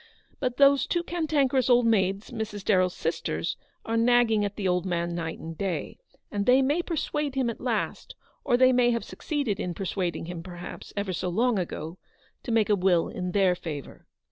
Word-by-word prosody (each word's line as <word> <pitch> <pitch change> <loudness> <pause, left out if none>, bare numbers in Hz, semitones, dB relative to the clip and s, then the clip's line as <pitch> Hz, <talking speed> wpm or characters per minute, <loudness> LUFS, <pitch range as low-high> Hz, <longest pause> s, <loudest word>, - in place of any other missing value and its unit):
But 250 -2 -2
those 280 -1 +5
two 345 -1 0
cantankerous 290 -7 +1
old 245 -1 +5
maids, 195 -2 +1
Mrs. 210 -2 -5
DarrelFs 185 -3 +3
sisters, 160 - -2 0.3
are 225 - -1
nagging 230 -2 +4
at 205 0 -3
the 200 -3 -2
old 180 -1 +1
man 170 -2 -1
night 165 -1 -4
and 165 0 -8
day, 190 0 -3 0.3
and 205 -2 -2
they 260 +2 +6
may 290 +6 +2
persuade 300 -4 -2
him 255 -3 +1
at - - -11
last, 240 -4 -2 0.3
or 245 -3 +3
they 255 0 +5
may 245 -1 +4
have 235 -1 0
succeeded 280 - -3
in 175 -4 -3
per 195 - -4
suading 175 -4 -2
him, 175 0 -6
perhaps, 175 0 -9
ever 200 -2 -1
so 180 +1 -2
long 225 +4 +2
ago, 170 -1 -5 0.4
to 240 - -5
make 220 -2 +3
a - - +5
will 180 -3 +2
in 180 -1 -4
their 190 -1 +3
favour. 155 -5 -7
205 Hz, 195 wpm, -27 LUFS, 180-250 Hz, 0.4 s, they